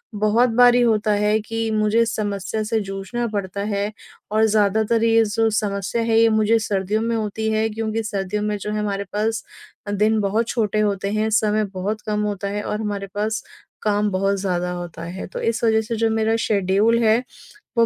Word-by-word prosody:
बहुत 215 Hz, +4 st, +3 dB
बारी 245 Hz, +1 st, +5 dB
होता 220 Hz, -2 st, +2 dB
है 210 Hz, +1 st, +2 dB
कि 225 Hz, +1 st, -3 dB
मुझे 215 Hz, +2 st, +2 dB
समस्या 215 Hz, -1 st, -2 dB
से 220 Hz, +1 st, 0 dB
जूझना 195 Hz, +5 st, -4 dB
पड़ता 200 Hz, -2 st, -4 dB
है। 205 Hz, 0 st, -1 dB, 0.4 s
और 220 Hz, +1 st, +3 dB
ज़्यादातर 220 Hz, +2 st, +2 dB
ये 225 Hz, 0 st, +4 dB
जो 225 Hz, +1 st, +1 dB
समस्या 200 Hz, +2 st, -2 dB
है 225 Hz, 0 st, +3 dB
ये 230 Hz, -, +6 dB
मुझे 220 Hz, +1 st, +3 dB
सर्दियों 210 Hz, 0 st, -1 dB
में 230 Hz, 0 st, 0 dB
होती 220 Hz, 0 st, -2 dB
है। 220 Hz, +1 st, +1 dB
क्योंकि 220 Hz, +1 st, -2 dB
सर्दियों 210 Hz, -1 st, -2 dB
में 210 Hz, 0 st, -1 dB
जो 210 Hz, +1 st, -5 dB
है 210 Hz, -, -1 dB
हमारे 200 Hz, -1 st, -2 dB
अ, -, -, -21 dB
पास 220 Hz, +1 st, -1 dB, 0.5 s
दिन 215 Hz, +2 st, +2 dB
बहुत 215 Hz, +3 st, 0 dB
छोटे 215 Hz, -3 st, 0 dB
होते 200 Hz, -1 st, 0 dB
हैं 215 Hz, +1 st, 0 dB
समय 215 Hz, 0 st, +2 dB
बहुत 205 Hz, +4 st, -3 dB
कम 210 Hz, 0 st, -1 dB
होता 200 Hz, -1 st, -2 dB
है 205 Hz, +1 st, -3 dB
और 210 Hz, +1 st, -3 dB
हमारे 200 Hz, -2 st, -3 dB
पास 215 Hz, +1 st, -1 dB, 0.4 s
काम 210 Hz, 0 st, +1 dB
बहुत 195 Hz, +1 st, +1 dB
ज़्यादा 180 Hz, -2 st, -1 dB
होता 175 Hz, -2 st, -6 dB
है। 175 Hz, +3 st, -6 dB
तो -, -, -7 dB
इस 230 Hz, +1 st, -1 dB
वज़ह 220 Hz, -1 st, +3 dB
से 225 Hz, +1 st, -4 dB
जो 225 Hz, 0 st, +1 dB
मेरा 220 Hz, 0 st, +1 dB
शेड्यूल 205 Hz, +3 st, +2 dB
है 220 Hz, 0 st, +5 dB, 0.6 s
वो 230 Hz, -, +6 dB
215 Hz, 195 wpm, -21 LUFS, 200-225 Hz, 0.6 s, ये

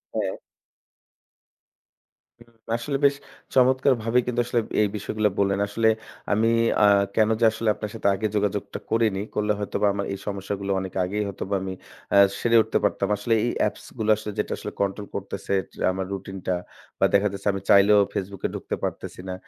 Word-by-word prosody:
হ্যাঁ। -, -, -1 dB, 2.1 s
হু, -, -, -12 dB, 0.3 s
আসলে 130 Hz, +4 st, -2 dB
বেশ 140 Hz, 0 st, +4 dB, 0.4 s
চমৎকারভাবে 130 Hz, -2 st, +3 dB
কিন্তু 125 Hz, -1 st, -1 dB
আসলে 120 Hz, 0 st, +1 dB, 0.2 s
এই 105 Hz, -, +4 dB
বিষয়গুলা 105 Hz, +1 st, 0 dB
বললেন। 100 Hz, 0 st, +2 dB
আসলে 110 Hz, +2 st, +2 dB, 0.4 s
আমি 110 Hz, +2 st, +3 dB, 0.3 s
আ -, -, +8 dB, 0.3 s
কেন 110 Hz, -1 st, +4 dB
যে 115 Hz, -, +4 dB
আসলে 115 Hz, 0 st, -1 dB
আপনার 105 Hz, -1 st, -6 dB
সাথে 110 Hz, -, -1 dB
আগে 110 Hz, +3 st, -1 dB
যোগাযোগটা 105 Hz, -1 st, -1 dB
করিনি। 110 Hz, -4 st, +2 dB
করলে 105 Hz, 0 st, +1 dB
হয়তোবা 105 Hz, 0 st, 0 dB
আমার 100 Hz, 0 st, -2 dB
এই -, -, -4 dB
সমস্যাগুলা 100 Hz, 0 st, -3 dB
অনেক 95 Hz, -1 st, -6 dB
আগেই 105 Hz, +4 st, -1 dB
হয়তোবা 100 Hz, 0 st, -3 dB
আমি 95 Hz, 0 st, -4 dB, 0.4 s
আ -, -, +7 dB, 0.2 s
সেরে 115 Hz, -1 st, +2 dB
উঠতে -, -, 0 dB
পারতাম। 100 Hz, -, +1 dB
আসলে 110 Hz, +3 st, 0 dB
এই 120 Hz, -, 0 dB, 0.2 s
appsগুলা 110 Hz, -2 st, -3 dB
আসলে 110 Hz, -1 st, -6 dB
যেটা -, -, -1 dB
আসলে -, -, -6 dB
control 100 Hz, +1 st, -1 dB
করতেছে 100 Hz, 0 st, -4 dB, 0.2 s
যে -, -, -10 dB
আমার 95 Hz, 0 st, -3 dB
routine-টা 95 Hz, -1 st, -4 dB, 0.5 s
বা -, -, +5 dB
দেখা 100 Hz, +1 st, +4 dB
যাচ্ছে 100 Hz, +1 st, -5 dB
আমি 100 Hz, -, -4 dB
চাইলেও 100 Hz, +1 st, +7 dB
Facebook-এ 100 Hz, 0 st, -3 dB
ঢুকতে -, -, -4 dB
পারতেছি -, -, -4 dB
না। -, -, -2 dB
105 Hz, 165 wpm, -24 LUFS, 100-115 Hz, 2.1 s, আ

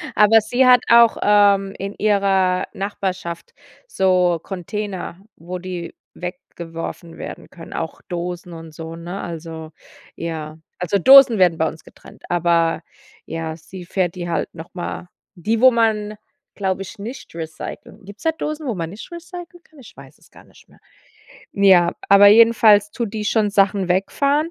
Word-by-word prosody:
Aber 215 Hz, +2 st, +6 dB
sie 245 Hz, +4 st, +1 dB
hat 250 Hz, -1 st, +7 dB
auch, 235 Hz, -1 st, +6 dB
ähm, 200 Hz, -1 st, +3 dB
in 200 Hz, +1 st, -5 dB
ihrer 195 Hz, -3 st, +1 dB
Nachbarschaft 195 Hz, -, -5 dB, 0.3 s
so 180 Hz, -, +2 dB
Container, 190 Hz, -1 st, -5 dB, 0.2 s
wo 175 Hz, +3 st, -7 dB
die 180 Hz, -2 st, -7 dB, 0.2 s
weggeworfen 170 Hz, -1 st, -8 dB
werden -, -, -9 dB
können, 165 Hz, -2 st, -12 dB
auch 165 Hz, -, -5 dB
Dosen 175 Hz, 0 st, -5 dB
und 165 Hz, -1 st, -11 dB
so, 160 Hz, +1 st, -8 dB
ne? 175 Hz, +3 st, -7 dB
Also, 160 Hz, -1 st, -8 dB, 0.4 s
ja. 160 Hz, -2 st, -6 dB, 0.2 s
Also, 180 Hz, +3 st, 0 dB
Dosen 265 Hz, 0 st, +8 dB
werden 175 Hz, -3 st, +4 dB
bei 160 Hz, -, +1 dB
uns 160 Hz, -, -8 dB
getrennt, -, -, -17 dB
aber 170 Hz, -2 st, +1 dB, 0.4 s
ja, 160 Hz, -1 st, -5 dB
sie 175 Hz, +3 st, -11 dB
fährt 180 Hz, -1 st, -1 dB
die 175 Hz, -1 st, -5 dB
halt 170 Hz, -, -2 dB
nochmal 175 Hz, +1 st, -7 dB, 0.3 s
die 220 Hz, +6 st, -1 dB
wo 260 Hz, -, +8 dB
man, 220 Hz, -3 st, 0 dB, 0.4 s
glaube 190 Hz, -1 st, -2 dB
ich, 195 Hz, +4 st, -9 dB
nicht 230 Hz, -3 st, -9 dB
recyclen 160 Hz, +6 st, -8 dB
gibt's 205 Hz, +2 st, -13 dB
da 320 Hz, -, +2 dB
Dosen, 305 Hz, -1 st, -5 dB
wo 240 Hz, -, -1 dB
man 165 Hz, -2 st, -4 dB
nicht 205 Hz, -, -11 dB
recyclen 350 Hz, 0 st, -10 dB
kann? 315 Hz, -, -24 dB
Ich 255 Hz, -, -15 dB
weiß -, -, -15 dB
es -, -, -24 dB
gar -, -, -17 dB
nicht -, -, -22 dB
mehr. -, -, -23 dB, 0.7 s
Ja, 190 Hz, -3 st, +4 dB, 0.2 s
aber 200 Hz, 0 st, +7 dB
jedenfalls 215 Hz, -1 st, +6 dB
tut 230 Hz, -1 st, -4 dB
die 215 Hz, -1 st, -3 dB
schon 210 Hz, 0 st, +1 dB
Sachen 195 Hz, -1 st, +2 dB
wegfahren. 280 Hz, -, +1 dB
190 Hz, 155 wpm, -20 LUFS, 170-215 Hz, 0.7 s, Dosen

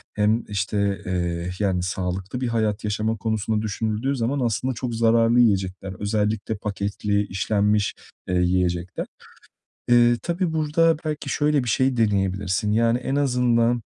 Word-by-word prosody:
hem, 110 Hz, +2 st, +2 dB
işte, 100 Hz, 0 st, -1 dB
eee, 85 Hz, -1 st, -2 dB
yani, 95 Hz, -4 st, 0 dB
sağlıklı 95 Hz, +5 st, -3 dB
bir 125 Hz, -, 0 dB
hayat 110 Hz, -2 st, -1 dB
yaşama 110 Hz, +1 st, -1 dB
konusunda 110 Hz, 0 st, -1 dB
düşünüldüğü 110 Hz, +5 st, -2 dB
zaman 130 Hz, +3 st, -1 dB
aslında 125 Hz, +1 st, 0 dB
çok 120 Hz, 0 st, -4 dB
zararlı 115 Hz, +1 st, +3 dB
yiyecekler. 95 Hz, -4 st, +1 dB
Özellikle 105 Hz, +1 st, -1 dB
paketli, 100 Hz, 0 st, -2 dB
işlenmiş, 105 Hz, +1 st, +1 dB, 0.3 s
eee, 90 Hz, -, -1 dB
yiyecekler. 90 Hz, 0 st, 0 dB, 0.8 s
Eee, 120 Hz, 0 st, +5 dB
tabii 170 Hz, 0 st, -1 dB
burada 160 Hz, +1 st, +2 dB
belki 155 Hz, -1 st, -3 dB
şöyle 150 Hz, -3 st, +1 dB
bir -, -, -4 dB
şey 130 Hz, +2 st, +2 dB
deneyebilirsin. 100 Hz, -1 st, 0 dB
Yani, 115 Hz, +2 st, +3 dB
en 135 Hz, +2 st, -3 dB
azından, 120 Hz, -3 st, +2 dB
110 Hz, 135 wpm, -23 LUFS, 100-120 Hz, 0.8 s, Eee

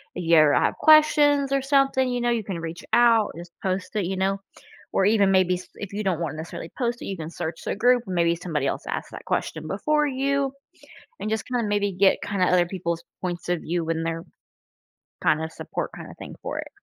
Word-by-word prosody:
if 180 Hz, -, -4 dB
you 165 Hz, 0 st, +4 dB
ever 155 Hz, -2 st, +6 dB
have -, -, +2 dB
questions 295 Hz, -3 st, +5 dB
or 275 Hz, 0 st, +2 dB
something, 270 Hz, -1 st, +2 dB
you 245 Hz, -1 st, -1 dB
know, 240 Hz, -, +1 dB
you 235 Hz, -2 st, 0 dB
can 185 Hz, -4 st, -4 dB
reach 165 Hz, +1 st, -6 dB
out, 235 Hz, -3 st, +5 dB
just 175 Hz, 0 st, -9 dB
post 190 Hz, +1 st, -3 dB
it, 205 Hz, -4 st, 0 dB
you 190 Hz, +2 st, -2 dB
know? 195 Hz, +1 st, 0 dB, 0.5 s
Or 190 Hz, -, +3 dB
even 205 Hz, -2 st, +4 dB
maybe 185 Hz, -1 st, +3 dB
s 180 Hz, 0 st, -8 dB
if 205 Hz, -, -7 dB
you 205 Hz, -, -2 dB
don't 185 Hz, -5 st, 0 dB
wanna 155 Hz, -3 st, -3 dB
necessarily 160 Hz, +1 st, -7 dB
post 240 Hz, -1 st, -1 dB
it, -, -, -6 dB
you 195 Hz, -, -4 dB
can 160 Hz, -1 st, -6 dB
search 165 Hz, -1 st, -5 dB
the -, -, -1 dB
group. 245 Hz, +3 st, +3 dB
Maybe 170 Hz, -2 st, +2 dB
somebody 155 Hz, -5 st, -2 dB
else -, -, -2 dB
asked -, -, -4 dB
that -, -, -9 dB
question 155 Hz, -1 st, -2 dB
before 300 Hz, -, +1 dB
you 275 Hz, 0 st, 0 dB, 0.7 s
and -, -, -3 dB
just 220 Hz, 0 st, -1 dB
kind 245 Hz, -1 st, 0 dB
of -, -, -2 dB
maybe 205 Hz, -1 st, +1 dB
get 190 Hz, +1 st, +4 dB
kinda 195 Hz, -3 st, +1 dB
other 180 Hz, -1 st, +3 dB
people's 170 Hz, -2 st, -3 dB, 0.2 s
points 175 Hz, -1 st, -4 dB
of 175 Hz, -2 st, +1 dB
view 170 Hz, +1 st, -2 dB
when 165 Hz, 0 st, -1 dB
they're 165 Hz, 0 st, -3 dB, 1.0 s
kinda 160 Hz, +1 st, +2 dB
support -, -, -5 dB
kinda -, -, -9 dB
thing -, -, -9 dB
for -, -, -4 dB
it. -, -, -6 dB
190 Hz, 220 wpm, -24 LUFS, 170-240 Hz, 1.0 s, ever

